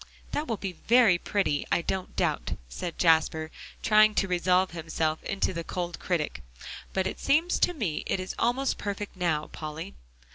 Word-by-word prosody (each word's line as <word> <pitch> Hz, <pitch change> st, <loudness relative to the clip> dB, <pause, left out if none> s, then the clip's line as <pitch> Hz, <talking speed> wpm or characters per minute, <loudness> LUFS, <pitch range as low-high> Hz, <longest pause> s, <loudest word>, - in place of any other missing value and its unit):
"That 300 Hz, -, -2 dB
will 225 Hz, -3 st, -1 dB
be 195 Hz, -1 st, -4 dB, 0.2 s
very 225 Hz, -7 st, +6 dB
pretty, 190 Hz, -9 st, 0 dB
I 170 Hz, -, +2 dB
don't 190 Hz, +1 st, -3 dB
doubt," -, -, 0 dB
said 170 Hz, -, -5 dB
Jasper, 160 Hz, -1 st, +3 dB, 0.3 s
trying 215 Hz, 0 st, +5 dB
to 195 Hz, -, +2 dB
resolve 180 Hz, +1 st, +2 dB
himself 160 Hz, -1 st, -2 dB
into 195 Hz, -1 st, -1 dB
the 170 Hz, -1 st, -4 dB
cold 175 Hz, 0 st, -4 dB
critic, 170 Hz, -5 st, -2 dB, 0.5 s
"but 190 Hz, -1 st, 0 dB
it 190 Hz, -, -3 dB
seems 320 Hz, +5 st, +2 dB
to 355 Hz, -, +3 dB
me 195 Hz, -, -1 dB
it -, -, 0 dB
is 185 Hz, 0 st, -4 dB
almost 260 Hz, +3 st, +1 dB
perfect 205 Hz, 0 st, -4 dB
now, 165 Hz, -4 st, 0 dB
Polly." 155 Hz, -, -6 dB
185 Hz, 170 wpm, -28 LUFS, 160-210 Hz, 0.5 s, very